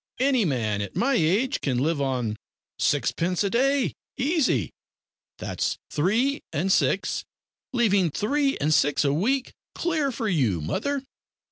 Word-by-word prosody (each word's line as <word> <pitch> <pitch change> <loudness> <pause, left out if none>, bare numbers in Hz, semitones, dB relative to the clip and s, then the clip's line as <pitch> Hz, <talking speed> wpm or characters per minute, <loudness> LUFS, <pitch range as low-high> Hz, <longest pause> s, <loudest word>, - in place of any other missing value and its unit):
Any 260 -4 +3
man 110 - 0
at 100 - -6
my 275 +3 +2
age 195 +8 +1
can 130 -4 0
live 145 +3 0
on 125 -5 -1 0.4
sixpence 180 +3 +1
a 200 - -1
day 270 +2 +2 0.2
easy 300 +1 +1 0.7
that's - - -2
three 225 - +1
and 175 +5 0
six, - - +1 0.5
leaving 200 -8 +3
three 275 - 0
and 155 +2 +1
six 145 +1 +3
a 140 - +2
week 255 - 0 0.2
clear 315 -5 0
for 230 -2 -3
you, 130 - +1
mother. 275 - -2
195 Hz, 135 wpm, -25 LUFS, -, 0.7 s, Any